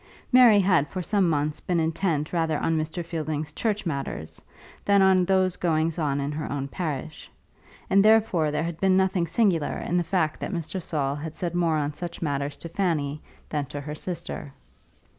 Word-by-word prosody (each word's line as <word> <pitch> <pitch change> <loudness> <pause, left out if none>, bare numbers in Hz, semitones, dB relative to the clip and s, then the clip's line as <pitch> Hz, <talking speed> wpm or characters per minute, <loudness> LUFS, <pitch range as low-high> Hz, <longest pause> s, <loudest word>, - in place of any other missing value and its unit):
Mary 245 -5 +7
had 180 -7 +3
for 185 +1 -5
some 195 -1 +2
months 150 -1 0
been 175 -2 -1
intent 160 -1 -1
rather 165 -3 +1
on 165 - 0
Mr. 160 +2 -3
Fielding's 155 -2 -3
church 210 0 -1
matters 140 - -4 0.4
than 200 0 +4
on 190 -1 +5
those 185 -1 +2
going 160 -1 +1
on 145 -3 0
in 140 +1 -2
her 150 +1 -4
own 140 -1 -2
parish, 155 -1 -5 0.6
and 195 +1 +4
therefore 215 -8 +4
there 150 +1 -1
had 170 -1 -4
been 190 -1 +3
nothing 190 -2 +1
singular 170 -3 +1
in 175 - -1
the 175 - +2
fact 165 -2 0
that - - -4
Mr. 180 +1 -4
Saul 145 -5 -1
had 155 +2 -6
said 170 +1 -3
more 170 -2 +1
on 150 0 -1
such 170 +2 -6
matters 145 -2 -2
to 170 - -8
Fanny 155 -6 -1 0.3
than 145 -2 -2
to 145 - -6
her 150 +1 -6
sister. 170 -3 -6
165 Hz, 185 wpm, -26 LUFS, 150-185 Hz, 0.6 s, Mary